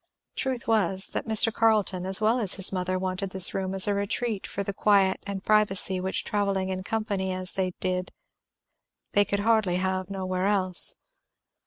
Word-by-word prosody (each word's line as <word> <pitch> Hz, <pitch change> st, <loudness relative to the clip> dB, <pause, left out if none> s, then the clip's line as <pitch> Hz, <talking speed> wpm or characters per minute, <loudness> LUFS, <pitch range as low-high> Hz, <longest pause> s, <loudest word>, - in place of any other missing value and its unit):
Truth 260 Hz, -3 st, -3 dB
was, 195 Hz, -4 st, 0 dB
that -, -, -5 dB
Mr. 220 Hz, 0 st, +4 dB
Carleton 210 Hz, -5 st, 0 dB
as 190 Hz, 0 st, +3 dB
well 220 Hz, +3 st, +1 dB
as 205 Hz, -6 st, +2 dB
his 190 Hz, -1 st, +6 dB
mother 185 Hz, 0 st, -2 dB
wanted 185 Hz, +1 st, -4 dB
this 190 Hz, -1 st, +2 dB
room 190 Hz, 0 st, -3 dB
as 190 Hz, -, +4 dB
a 205 Hz, -, +1 dB
retreat 200 Hz, +1 st, -3 dB
for 200 Hz, -, -5 dB
the 200 Hz, -, -5 dB
quiet 195 Hz, -2 st, +2 dB
and 195 Hz, -1 st, -6 dB
privacy 195 Hz, -3 st, +2 dB
which 190 Hz, +1 st, -2 dB
travelling 200 Hz, -2 st, -2 dB
in 185 Hz, 0 st, -4 dB
company 200 Hz, -2 st, -3 dB
as 185 Hz, 0 st, -2 dB
they 185 Hz, -2 st, -3 dB
did 185 Hz, 0 st, -3 dB, 1.0 s
they 205 Hz, -, +3 dB
could 200 Hz, 0 st, -2 dB
have 190 Hz, -4 st, 0 dB
nowhere 185 Hz, -1 st, -3 dB
else. 185 Hz, -3 st, +4 dB
195 Hz, 170 wpm, -25 LUFS, 185-210 Hz, 1.0 s, his